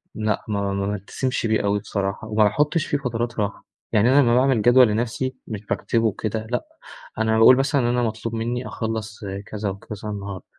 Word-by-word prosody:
لأ 110 -1 -1
ما 100 -2 -1
ما 100 0 -1
بالتزمش 105 +6 -3
بيه 110 -1 +2
أوي 100 0 +1
بصراحة 100 0 -3
وما 110 0 +3
باحطش 150 - +2
في 145 - 0
فترات 120 -3 -3
راحة. 100 -1 -3 0.3
يعني 110 +3 +4
أنا 140 +2 +6
لمّا 120 -3 +3
باعمل 130 -2 +3
جدول 120 +3 +6
لنفسي 120 +4 -2
مش 105 -1 -6
باكتبه 115 +2 0
وكده، 110 +1 -2
لأ، 125 - -1 0.5
أنا 110 0 +2
باقول 125 +3 +8
مثلًا 140 +1 +2
إن - - 0
أنا 120 0 +1
مطلوب 115 0 -3
منّي 120 +2 -2
أخلص 110 -1 -4 0.3
كذا 105 -1 -4
وكذا 105 +2 -7
النهاردة. 100 -2 -6
110 Hz, 185 wpm, -23 LUFS, 105-125 Hz, 0.5 s, باقول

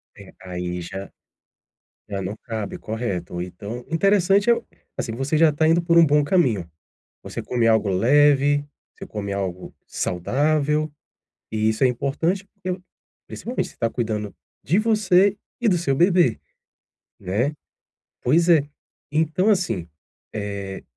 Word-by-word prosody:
É, - - -14
aí 90 -1 -4
já 95 +3 -7 1.0
já 100 -2 -3
não 95 +4 -4
cabe, 110 -3 -4
correto. 100 -6 -4
Então, 100 +7 -7
interessante 195 +4 +3
é - - +7 0.4
assim, 115 - -3
você 135 +6 -1
já 160 0 +6
está 150 +2 +1
indo 165 +2 +4
por 170 0 +4
um 165 - +7
bom 150 0 +4
caminho. 130 - +1 0.5
Você - - -5
come 120 -2 0
algo 110 -2 +3
leve, 145 +7 +4 0.3
você - - -10
come 100 -2 -5
algo 95 -2 -4
saudável, 150 - 0 0.6
e 110 0 +1
isso 110 +4 0
é 130 - +7
importante, 150 +10 -1
porque 185 -2 -5 0.5
principalmente 245 +2 -4
você - - -17
está 115 - 0
cuidando 110 -4 -3 0.3
de 175 +9 +2
você 205 -3 +3 0.2
e 245 - +1
do 185 -4 +4
seu 165 -5 0
bebê, 175 - +3 0.8
né. 105 +10 0 0.7
Pois 165 +7 +3
é, 160 -4 +6 0.5
então 160 +6 +2
assim, 165 - 0 0.4
eh, 100 -2 -5
135 Hz, 135 wpm, -23 LUFS, 105-170 Hz, 1.0 s, é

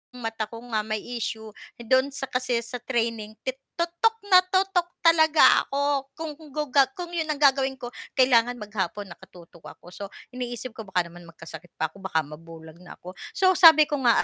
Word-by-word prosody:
mata 225 -3 -4
ko 230 +1 -10
nga 215 - +1
may 215 0 -4 0.2
issue, 220 0 -5 0.3
dun 260 +3 +2
sa 275 0 -8
kasi 250 -1 -2
sa 245 +2 -7
training 230 -3 -3
ti 260 - 0 0.2
tutok 345 +7 +1 0.2
na 365 - +9
tutok 375 -1 +1 0.2
talaga 320 -2 +5 0.2
ako 280 -1 -1
kung 320 -1 -5 0.2
gu 295 -1 -4 0.3
kung 350 -1 -6
'yon 320 -2 -2
ang 305 - 0
gagawin 270 -2 +3
ko, 240 -2 -8 0.2
kailangan 245 -2 +4
maghapon 205 -2 -4
nakatutok 170 -1 -15
ako. 175 - -16
So, 205 - -8 0.3
iniisip 245 0 -6
ko 220 -2 -10
baka 180 -2 -1
naman 175 0 -14
magkasakit 165 0 -12
pa 160 -1 -2
ako, 195 - -17
baka 160 -4 0
mabulag 160 +2 -13
na 180 -1 -12
ako. 180 - -11 0.2
So, 375 -1 +4
sabi 320 -4 +9
ko 290 -1 -3
nga 235 - +4
240 Hz, 180 wpm, -25 LUFS, 195-290 Hz, 0.3 s, na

